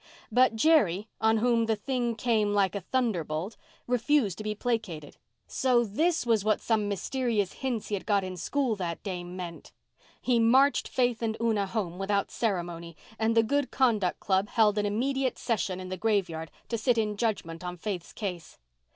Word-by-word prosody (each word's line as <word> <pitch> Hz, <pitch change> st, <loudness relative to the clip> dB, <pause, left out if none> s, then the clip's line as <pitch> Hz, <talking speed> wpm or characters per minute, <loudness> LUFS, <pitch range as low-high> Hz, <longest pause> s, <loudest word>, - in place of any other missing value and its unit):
But 250 Hz, 0 st, +4 dB
Jerry, 220 Hz, -, +3 dB
on 220 Hz, 0 st, +3 dB
whom 230 Hz, 0 st, +2 dB
the 220 Hz, -, +2 dB
thing 240 Hz, +2 st, -2 dB
came 220 Hz, -3 st, +1 dB
like 195 Hz, -2 st, +2 dB
a 200 Hz, -, -3 dB
thunderbolt, 185 Hz, -, -1 dB, 0.3 s
refused 245 Hz, -, +1 dB
to -, -, -5 dB
be 215 Hz, 0 st, -2 dB
placated. 210 Hz, -, -3 dB, 0.3 s
So 250 Hz, -2 st, +2 dB
this 310 Hz, -, 0 dB
was 225 Hz, -4 st, +2 dB
what 215 Hz, 0 st, +2 dB
some 215 Hz, -3 st, 0 dB
mysterious 210 Hz, -1 st, -1 dB
hints 250 Hz, -5 st, -3 dB
he -, -, -4 dB
had 200 Hz, -, -3 dB
got 200 Hz, -2 st, +2 dB
in 185 Hz, 0 st, -5 dB
school 255 Hz, -, 0 dB
that 170 Hz, -3 st, -4 dB
day 185 Hz, -3 st, -4 dB
meant! 175 Hz, -1 st, -8 dB, 0.5 s
He 245 Hz, -2 st, +2 dB
marched 260 Hz, +5 st, +4 dB
Faith 245 Hz, -3 st, 0 dB
and 220 Hz, -1 st, -1 dB
Una 220 Hz, -4 st, +1 dB
home 190 Hz, -4 st, -3 dB
without 200 Hz, 0 st, 0 dB
ceremony, 170 Hz, -6 st, -3 dB, 0.2 s
and 225 Hz, +1 st, +1 dB
the 225 Hz, -, +6 dB
Good 285 Hz, +4 st, 0 dB
Conduct 220 Hz, -9 st, +1 dB
Club 195 Hz, 0 st, +1 dB
held 215 Hz, -2 st, +3 dB
an 205 Hz, -, +1 dB
immediate 260 Hz, +5 st, 0 dB
session 195 Hz, -5 st, -1 dB
in 185 Hz, 0 st, -7 dB
the 185 Hz, -, -4 dB
graveyard 180 Hz, -6 st, 0 dB, 0.2 s
to 230 Hz, -, -1 dB
sit 240 Hz, +2 st, +2 dB
in 210 Hz, -2 st, 0 dB
judgment 200 Hz, -7 st, -2 dB
on 180 Hz, 0 st, -5 dB
Faith's 180 Hz, -1 st, -5 dB
case. 180 Hz, -6 st, -6 dB
215 Hz, 175 wpm, -28 LUFS, 185-235 Hz, 0.5 s, the